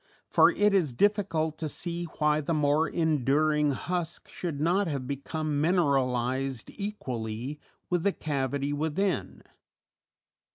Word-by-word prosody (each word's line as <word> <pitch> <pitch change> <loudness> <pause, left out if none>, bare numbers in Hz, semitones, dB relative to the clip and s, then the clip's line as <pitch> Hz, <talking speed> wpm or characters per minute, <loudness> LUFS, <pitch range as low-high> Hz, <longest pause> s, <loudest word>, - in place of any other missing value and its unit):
For - - +5
it 205 0 +2
is 165 -10 +2
difficult 165 - +1
to 155 - -2
see 170 +2 -2
why 150 0 +2
the 160 +3 -1
more 150 +1 +2
enduring 150 -1 +2
husk 175 +3 -4
should 165 -6 -4
not 175 +6 +2
have 140 -5 -3
become 145 +2 -2
mineralized 135 -6 +1
equally 130 - -4 0.3
with 175 -1 +2
the 200 - +2
cavity 140 -1 -2
within. 160 +6 -1
150 Hz, 120 wpm, -28 LUFS, 140-170 Hz, 0.3 s, For